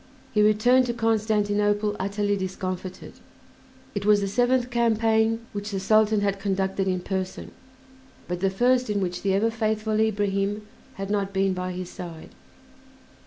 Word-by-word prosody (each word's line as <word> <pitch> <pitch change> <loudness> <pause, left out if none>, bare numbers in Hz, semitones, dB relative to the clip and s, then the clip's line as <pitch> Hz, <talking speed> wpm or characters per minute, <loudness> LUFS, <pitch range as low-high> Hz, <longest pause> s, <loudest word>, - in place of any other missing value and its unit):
He 210 - +3
returned 245 +5 +4
to 240 - -2
Constantinople 210 -2 +1
utterly 205 +1 0
discomfited. 185 -1 -5 0.8
It 200 - -3
was 210 0 +5
the 200 - -1
seventh 245 +3 +1
campaign 225 -1 +2
which 205 0 -4
the 195 -2 -2
Sultan 215 +1 +3
had 200 -1 0
conducted 195 -1 -1
in 185 -1 0
person, 190 0 -4 0.8
but 180 0 -3
the 195 +1 +2
first 245 +5 +2
in 205 -1 0
which 180 -2 -3
the 195 -1 +1
ever 225 +3 +2
faithful 220 -1 -1
Ibrahim 205 -1 0 0.3
had 195 +1 -5
not 200 -1 -1
been 195 0 +1
by 185 0 -3
his 180 0 -6
side. 170 -3 -9
205 Hz, 150 wpm, -25 LUFS, 195-220 Hz, 0.8 s, was